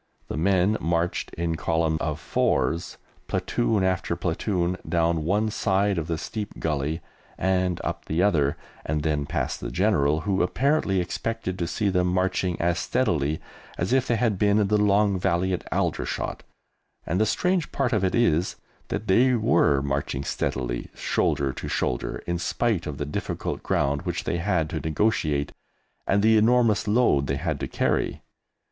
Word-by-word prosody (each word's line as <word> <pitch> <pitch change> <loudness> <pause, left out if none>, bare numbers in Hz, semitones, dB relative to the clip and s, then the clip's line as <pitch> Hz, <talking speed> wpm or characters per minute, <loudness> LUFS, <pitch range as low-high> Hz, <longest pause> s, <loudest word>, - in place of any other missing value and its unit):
The - - -3
men 95 +5 +2
marched 85 +1 -1
in 85 0 -1
column 80 -1 0
of 75 -1 -2
fours, 85 +1 0 0.3
platoon 110 -4 0
after 95 -2 0
platoon, 90 +1 -1
down 85 -1 +1
one 105 +5 +1
side 100 -2 +1
of 80 - -4
the 85 -2 -1
steep 105 +5 -5
gully 75 +1 -1 0.4
and 95 -1 +1
up - - -4
the 80 +4 +1
other, 75 -9 +2 0.3
and 75 0 -2
then 75 -2 0
past - - -2
the - - -4
General, 80 -6 +2
who 95 +1 0
apparently 115 - +1
expected 95 +1 -3
to 85 - -1
see 100 +4 0
them 90 -1 +2
marching 90 0 0
as 85 0 +1
steadily 80 - 0 0.4
as 90 +8 0
if 130 -1 +2
they 120 - +2
had 110 -4 0
been 105 0 +3
in 105 -2 +2
the 105 0 +3
Long 100 -1 +3
Valley 90 +2 +1
at 90 - -5
Aldershot; - - -2 0.6
and 90 +5 0
the - - +4
strange 180 - 0
part 130 -2 0
of 105 -3 +1
it 95 - +1
is 90 -8 +2 0.3
that 105 - -3
they 125 +6 +4
were 75 - +3
marching 70 -1 -2
steadily, - - -2
shoulder 70 -1 0
to - - -6
shoulder, - - -2
in 85 0 -2
spite 105 0 0
of 75 -2 -5
the 75 - -3
difficult 75 - -4
ground 70 +1 0
which - - -3
they 85 - -1
had 85 -3 0
to 80 - -2
negotiate 75 -3 0 0.6
and 100 +1 +2
the 110 0 +5
enormous 115 -1 +3
load 105 - +3
they 70 - 0
had 80 -2 -2
to - - -3
carry. - - -1
90 Hz, 165 wpm, -25 LUFS, 80-105 Hz, 0.6 s, the